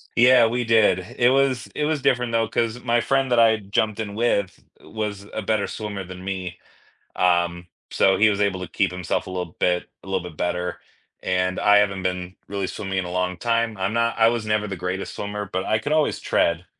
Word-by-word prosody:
Yeah, 125 0 +6
we 120 +2 0
did, 110 -5 +4 0.2
it 120 0 +5
was 135 -2 +1
it 150 - -1
was 150 -2 -1
different 125 -2 +1
though, 115 -1 +2
'cause 115 +2 -1
my 120 -1 +2
friend 135 0 +1
that 120 - +4
I 110 -1 +5
jumped 105 +2 -1
in 105 -2 -4
with 105 -4 -1 0.2
was 105 -2 -5
a 110 - -3
better 105 -1 0
swimmer 105 -3 -5
than 90 0 -10
me, 95 -2 -5 0.6
um, 85 -1 +1 0.2
so 95 0 +3
he 110 +1 +5
was 100 - -1
able 100 -2 +1
to 90 - -5
keep 95 -3 +1
himself 90 -2 -2
a 95 - -8
little 90 -3 -4
bit 90 0 +1
a - - -14
little 95 -2 -1
bit 85 -4 -10
better, 90 0 -2 0.4
and 90 0 0
I 105 0 +5
haven't 100 -2 +1
been 90 0 -3
really 100 -2 -3
swimming 95 -2 -3
in 90 - -2
a 90 - -6
long 90 0 -1
time. 115 +1 0
I'm 95 +3 -1
not 115 0 0
I 110 - +6
was 115 -2 -2
never 105 0 0
the 95 - -4
greatest 90 +2 -4
swimmer, 105 -1 -5
but 95 +1 -2
I 110 - +1
could 145 +6 -2
always 155 -1 +1
tread, 85 +1 +1
100 Hz, 220 wpm, -23 LUFS, 90-115 Hz, 0.6 s, Yeah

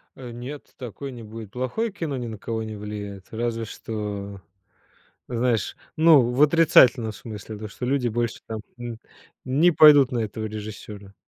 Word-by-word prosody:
Э, 125 -2 -9
нет, 125 +5 -8
такое 130 +3 -7
не 120 -2 -9
будет. 110 -1 -9
Плохое 130 - -2
кино 160 -8 -4
ни 120 - -4
на 110 -1 -6
кого 110 +2 -3
не 110 -1 -6
влияет. 100 -2 -7
Разве 115 0 -2
что, 100 -3 -6 0.9
знаешь, 120 -3 0 0.2
ну, 160 -3 +7
в 125 +3 0
отрицательном 140 -7 +5
смысле. 105 +2 -8
То, 110 +1 -6
что 115 +3 -6
люди 130 -1 +1
больше 120 0 -1
там, 110 -1 -5 0.2
м, 120 -2 -6 0.5
не 145 +7 +4
пойдут 145 -4 +7
на 120 - -1
этого 110 0 -3
режиссёра. 105 -2 -8
115 Hz, 160 wpm, -24 LUFS, 110-130 Hz, 0.9 s, ну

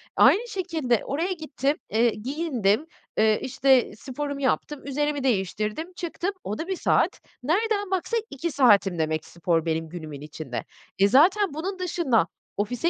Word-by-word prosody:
Aynı 465 +5 +5
şekilde 330 - 0
oraya 330 +7 -1
gittim, 300 -3 -2
eee, 230 +2 +3
giyindim, 255 0 0 0.3
eee, 215 -1 +4
işte, 265 -1 +3
sporumu 280 +3 -5
yaptım, 280 +1 -1
üzerimi 295 0 -1
değiştirdim, 215 - -1
çıktım, 350 +3 -3
o 210 - -3
da 325 - -4
1 380 - -1
saat. - - +1 0.2
Nereden 405 - 0
baksan 415 +5 0
2 305 +5 -3
saatim 205 - +4
demek 155 0 -1
spor 170 -1 -1
benim 160 0 -1
günümün 155 -4 -8
içinde. 150 -4 -6 0.4
E, 200 - +6
zaten 360 - +4
bunun 370 +6 -4
dışında 310 - +1 0.3
ofise 245 +10 0
275 Hz, 145 wpm, -25 LUFS, 210-335 Hz, 0.4 s, E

